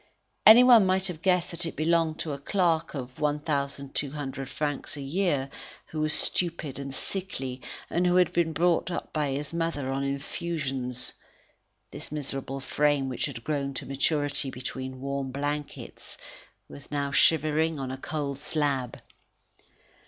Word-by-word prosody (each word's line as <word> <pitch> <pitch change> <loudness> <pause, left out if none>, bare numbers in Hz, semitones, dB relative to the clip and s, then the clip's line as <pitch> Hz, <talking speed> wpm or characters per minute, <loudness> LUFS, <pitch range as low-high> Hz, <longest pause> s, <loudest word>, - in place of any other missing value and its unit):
Anyone 235 -2 +9
might 190 0 +2
have 175 -4 -4
guessed 180 -2 +2
that 170 +1 -1
it 165 - +1
belonged 160 0 +2
to 155 - -3
a 140 - -5
clerk 165 -1 +1
at 130 -2 -6
1,200 140 -2 -2
francs 145 +1 -2
a - - -5
year, 145 -2 0 0.4
who 155 - -3
was 155 0 +2
stupid 165 -5 0
and 140 0 -5
sickly, 135 -6 -4 0.3
and 180 +1 +1
who 180 - +3
had 180 -2 +4
been 170 -2 +2
brought 170 +3 +2
up 175 - -4
by 150 -2 0
his 140 +3 -3
mother 165 -5 -1
on 135 +1 -1
infusions. 140 -3 -3 0.8
This - - -6
miserable 135 -2 -4
frame, 145 0 +1
which 125 - -2
had 120 -5 -7
grown 140 -2 -2
to - - -4
maturity 145 0 0
between 130 0 -5
warm 140 0 -2
blankets, 145 +2 -5 0.5
was 140 - -11
now 140 -1 -1
shivering 155 +2 +3
on 130 -1 -3
a 130 - -4
cold 140 -1 -3
slab. 145 -4 -1
145 Hz, 145 wpm, -28 LUFS, 135-165 Hz, 0.8 s, Anyone